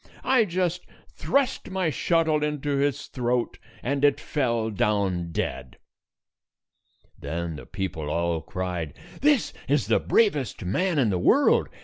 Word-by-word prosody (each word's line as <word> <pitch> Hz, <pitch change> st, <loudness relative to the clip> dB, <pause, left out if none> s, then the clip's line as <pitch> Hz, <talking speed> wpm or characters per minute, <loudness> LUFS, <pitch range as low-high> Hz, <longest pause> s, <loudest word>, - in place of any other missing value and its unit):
I 255 Hz, -3 st, +4 dB
just 180 Hz, -1 st, -2 dB, 0.2 s
thrust 275 Hz, -2 st, 0 dB
my 185 Hz, -4 st, 0 dB
shuttle 160 Hz, +1 st, +1 dB
into 145 Hz, -1 st, -1 dB
its 145 Hz, -1 st, 0 dB
throat, 125 Hz, -1 st, -1 dB, 0.2 s
and 140 Hz, +2 st, -1 dB
it 145 Hz, -1 st, +4 dB
fell 120 Hz, -6 st, -1 dB
down 95 Hz, -5 st, 0 dB
dead." 65 Hz, -5 st, -4 dB, 1.4 s
Then 80 Hz, +3 st, -4 dB
the -, -, -11 dB
people 90 Hz, -6 st, -4 dB
all 85 Hz, 0 st, 0 dB
cried, 90 Hz, -5 st, -4 dB, 0.3 s
"This 290 Hz, -3 st, +3 dB, 0.2 s
is 145 Hz, 0 st, +2 dB
the -, -, +3 dB
bravest 150 Hz, -, +1 dB
man 175 Hz, -, 0 dB
in 120 Hz, -7 st, +3 dB
the 90 Hz, -, 0 dB
world. 275 Hz, -, +4 dB
130 Hz, 130 wpm, -25 LUFS, -, 1.4 s, I